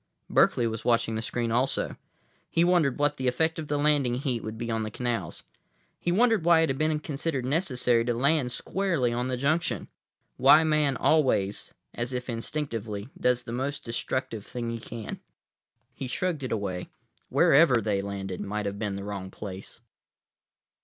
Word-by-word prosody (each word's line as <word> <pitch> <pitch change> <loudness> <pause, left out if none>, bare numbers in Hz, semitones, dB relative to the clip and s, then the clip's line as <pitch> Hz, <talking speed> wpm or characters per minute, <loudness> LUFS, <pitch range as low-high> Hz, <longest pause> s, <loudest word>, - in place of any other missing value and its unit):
Berkeley 120 - +4
was 110 -1 -3
watching 115 -1 +2
the 110 - -2
screen 115 0 -2
also. 130 +4 0 0.5
He 165 - +2
wondered 175 -7 +3
what 145 0 +1
the 130 - -1
effect 160 +6 +1
of 155 - -5
the 145 - 0
landing 145 -4 +2
heat 125 -3 -1
would 110 0 -5
be 120 0 -3
on 115 0 0
the 110 - -3
canals. 115 -6 -3 0.6
He 175 - -1
wondered 225 -1 +3
why 170 -1 +5
it 160 - +2
had 135 - -2
been 155 0 +1
considered 140 -3 -3
necessary 130 -6 +2
to 120 -1 0
land 135 0 +2
squarely 170 -8 0
on 125 +1 -1
the 130 -1 -2
junction; 155 +6 0 0.5
why 155 - +7
Man 150 -4 +2
always, 125 -10 +1 0.2
as 120 +2 -3
if 125 0 -4
instinctively, 115 -4 -4
does 125 0 +1
the 115 - -7
most 135 +4 -3
destructive 115 -2 -3
thing 120 0 -4
he 115 - -4
can. 110 -1 -7 0.7
He 135 - -5
shrugged 170 +4 -1
it 130 - -4
away. 95 -4 -3 0.4
Wherever 135 -4 +5
they 100 -3 0
landed 95 -2 -5
might 105 +1 -3
have 100 0 -3
been 105 -2 -2
the 100 - -5
wrong 100 -2 -5
place. 95 +1 -9
125 Hz, 175 wpm, -27 LUFS, 110-150 Hz, 0.7 s, why